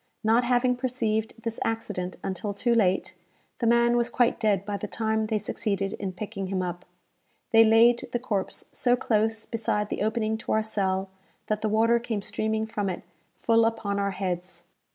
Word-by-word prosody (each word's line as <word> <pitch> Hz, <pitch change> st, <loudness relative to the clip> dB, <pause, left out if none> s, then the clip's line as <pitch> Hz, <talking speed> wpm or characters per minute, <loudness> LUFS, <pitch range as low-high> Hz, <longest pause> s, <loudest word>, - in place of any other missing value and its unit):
Not 225 Hz, +3 st, +4 dB
having 250 Hz, +1 st, +2 dB
perceived 235 Hz, -4 st, -1 dB
this 230 Hz, -1 st, -3 dB
accident 210 Hz, -5 st, -3 dB
until 195 Hz, +2 st, -3 dB
too 240 Hz, +3 st, +1 dB
late, 190 Hz, -5 st, +2 dB, 0.5 s
the 235 Hz, -, +1 dB
man 235 Hz, +1 st, +4 dB
was 240 Hz, 0 st, +2 dB
quite 245 Hz, 0 st, +2 dB
dead 200 Hz, -3 st, +1 dB
by 205 Hz, 0 st, -3 dB
the 210 Hz, -, -5 dB
time 220 Hz, 0 st, -1 dB
they 215 Hz, -1 st, 0 dB
succeeded 200 Hz, -1 st, -2 dB
in 195 Hz, -2 st, -4 dB
picking 195 Hz, +1 st, -5 dB
him 185 Hz, -1 st, -1 dB
up. 175 Hz, 0 st, -5 dB, 0.7 s
They 225 Hz, 0 st, +8 dB
laid 230 Hz, +2 st, +5 dB
the -, -, +1 dB
corpse 215 Hz, -6 st, -3 dB
so 245 Hz, -1 st, +2 dB
close 220 Hz, -1 st, 0 dB
beside 210 Hz, -2 st, -1 dB
the -, -, -3 dB
opening 220 Hz, 0 st, 0 dB
to -, -, -2 dB
our 220 Hz, -, +2 dB
cell, 190 Hz, -3 st, -1 dB, 0.3 s
that 215 Hz, 0 st, -1 dB
the 215 Hz, -, 0 dB
water 230 Hz, +2 st, +3 dB
came 225 Hz, -4 st, -3 dB
streaming 220 Hz, +1 st, -1 dB
from 205 Hz, -3 st, -2 dB
it 180 Hz, -, -5 dB, 0.3 s
full 230 Hz, +2 st, +3 dB
upon 220 Hz, -3 st, 0 dB
our 200 Hz, 0 st, +1 dB
heads. 180 Hz, -2 st, -4 dB
220 Hz, 180 wpm, -26 LUFS, 200-230 Hz, 0.7 s, They